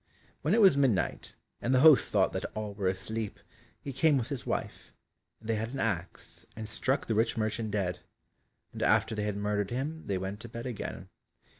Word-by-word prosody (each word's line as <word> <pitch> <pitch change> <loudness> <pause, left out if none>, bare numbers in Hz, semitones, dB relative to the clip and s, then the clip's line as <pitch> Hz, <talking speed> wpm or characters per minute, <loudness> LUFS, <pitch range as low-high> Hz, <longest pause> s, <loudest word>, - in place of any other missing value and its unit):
When 160 +8 +2
it 230 - +4
was 190 -7 +7
midnight, 135 -8 0 0.3
and 130 +2 +1
the 130 - +5
host 155 -2 +7
thought - - +3
that - - -3
all 105 -1 -4
were 100 -2 -2
asleep, 100 +3 -3 0.4
he 140 - -6
came 150 +1 +3
with 120 - -2
his 140 -4 -5
wife, - - -4 0.5
and 110 - -13
they 115 - +1
had 115 +3 -3
an 135 - -4
axe 95 -5 -3
and 110 0 -6
struck 130 +5 +1
the 115 - -1
rich 110 +2 +1
merchant 110 0 -1
dead; 95 -4 -1 0.7
and - - -7
after - - +3
they 105 -1 -2
had 105 -1 -2
murdered 105 -1 -1
him 145 +6 -4
they 100 - 0
went 95 +2 -4
to 120 +1 -9
bed 115 +1 -7
again. 105 -6 -5
110 Hz, 200 wpm, -30 LUFS, 105-130 Hz, 0.7 s, was